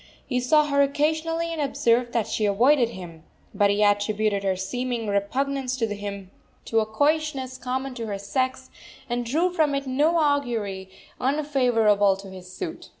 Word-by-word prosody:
He 250 -2 -1
saw 300 +5 +4
her 280 -1 +2
occasionally, 320 +4 0
and 320 - -3
observed 240 -3 +1
that 230 -3 0
she 215 - -1
avoided 240 +5 +3
him; 175 -6 -10 0.3
but 205 -1 +3
he 205 +1 +2
attributed 205 0 +1
her 190 -1 +1
seeming 240 +5 -3
repugnance 260 +6 -1
to 235 - +1
him 200 -2 -7 0.3
to 225 - +1
a 215 - 0
coyishness 285 +1 0
common 260 +2 -3
to 230 -2 -5
her 200 -2 -3
sex, 255 +6 -2 0.4
and 240 -1 -1
drew 325 +10 0
from 305 -5 +2
it 275 0 -2
no 295 +6 +2
augury 235 - 0 0.3
unfavorable 245 -8 +2
to 195 0 -10
his 185 -1 -11
suit. 335 - -7
245 Hz, 160 wpm, -25 LUFS, 205-285 Hz, 0.4 s, saw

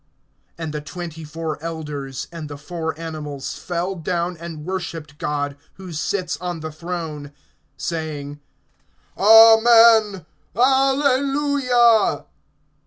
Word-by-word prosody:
(4)And 160 -2 -5
the 150 0 -4
twenty 165 +1 -8
four 155 0 -5
elders, 150 -5 -5
and 165 -3 -7
the 145 - -7
four 160 +1 -5
animals, 150 -4 -6
fell 175 +2 -3
down 175 +1 -2
and 165 -2 -8
worshiped 165 -5 -6
God, 145 -1 -2 0.2
who 185 -3 -10
sits 175 +3 -2
on 175 -2 -5
the 155 0 -5
throne, 155 -3 -6 0.5
saying: 150 -2 -5 0.8
Amen; 225 -2 +6 0.3
Alleluia. 270 -1 +3
170 Hz, 105 wpm, -21 LUFS, 150-215 Hz, 0.8 s, Amen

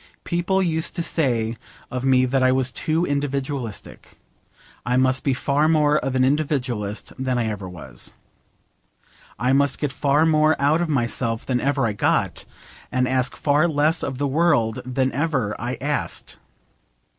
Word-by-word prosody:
People 180 +2 0
used 160 -2 -1
to 170 - -1
say 120 -9 0 0.3
of 125 0 -3
me 130 -1 +4
that 130 +1 +1
I 130 0 +4
was 130 -1 +1
too 160 +8 0
individualistic. 140 - -4 0.7
I 125 +1 +1
must 130 0 +2
be 135 -2 +1
far 145 +3 +1
more 150 -2 +3
of 130 0 -3
an 130 0 +3
individualist 125 -8 -1
than 130 -1 0
ever 105 -5 -2
I - - -8
was. 70 -9 -7 1.2
I 125 +2 +1
must 140 0 +3
get 150 -3 -2
far 145 +3 +2
more 155 -1 +3
out 145 +4 +3
of 175 - -1
myself 115 -4 -1
than 125 -2 0
ever 140 -2 +1
I 110 - 0
got, 105 - 0 0.5
and 125 0 +1
ask 130 0 0
far 150 +3 +2
less 155 +1 +1
of 135 -2 -3
the 145 +1 0
world 140 -7 +2
than 130 +1 0
ever 140 -8 -1
I 120 +3 -3
asked. 145 0 -3
135 Hz, 160 wpm, -22 LUFS, 125-150 Hz, 1.2 s, me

